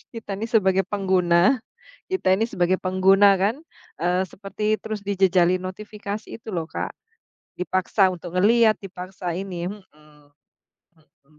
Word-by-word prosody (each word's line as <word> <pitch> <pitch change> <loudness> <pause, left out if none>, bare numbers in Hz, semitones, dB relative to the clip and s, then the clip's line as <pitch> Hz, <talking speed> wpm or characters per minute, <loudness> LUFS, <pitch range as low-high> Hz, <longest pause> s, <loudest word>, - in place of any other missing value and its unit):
kita 215 -3 -7
nih 225 - -3
sebagai 195 -5 +2
pengguna 190 +3 +2 0.5
kita 275 - +2
ini 210 - -1
sebagai 180 -3 +1
pengguna 195 +2 +5
kan, 215 +6 +2 0.5
eee, 180 +1 +2
seperti 210 +3 -3
terus 215 -1 -4
dijejali 185 -2 +2
notifikasi 205 +2 -6
itu - - -14
loh, 170 -5 -2
Kak. - - -4 0.7
Dipaksa 185 +2 +2
untuk 175 -1 -8
ngelihat, 220 +3 +4
dipaksa 185 -2 -6
ini, 180 -2 -4
hmm 205 0 -8 1.1
hmm. 150 -1 -30
190 Hz, 125 wpm, -23 LUFS, 180-210 Hz, 1.1 s, pengguna